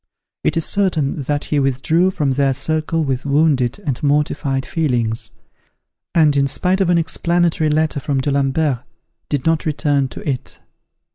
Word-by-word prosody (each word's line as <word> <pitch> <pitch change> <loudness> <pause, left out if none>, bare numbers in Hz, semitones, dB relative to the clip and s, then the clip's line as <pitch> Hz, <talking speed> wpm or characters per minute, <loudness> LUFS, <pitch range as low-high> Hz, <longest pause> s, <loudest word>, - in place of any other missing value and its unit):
It - - +1
is 165 - +2
certain 165 -8 0
that 145 +2 -2
he 150 - 0
withdrew 140 +7 +2
from 150 -7 -1
their 135 0 +1
circle 155 +3 0
with 135 -3 -2
wounded 140 -3 +2
and 135 -5 -2
mortified 140 -2 0
feelings, 120 -8 -1 0.9
and, 155 -3 +4
in 140 0 +3
spite 185 +7 +1
of 185 - +2
an 175 - +4
explanatory 170 -1 +1
letter 155 -1 +1
from 140 0 -1
D'Alembert, 140 0 0 0.5
did 145 -3 -2
not 160 -1 +1
return 145 -2 +1
to 125 - -10
it. 130 -3 -3
145 Hz, 150 wpm, -19 LUFS, 135-160 Hz, 0.9 s, and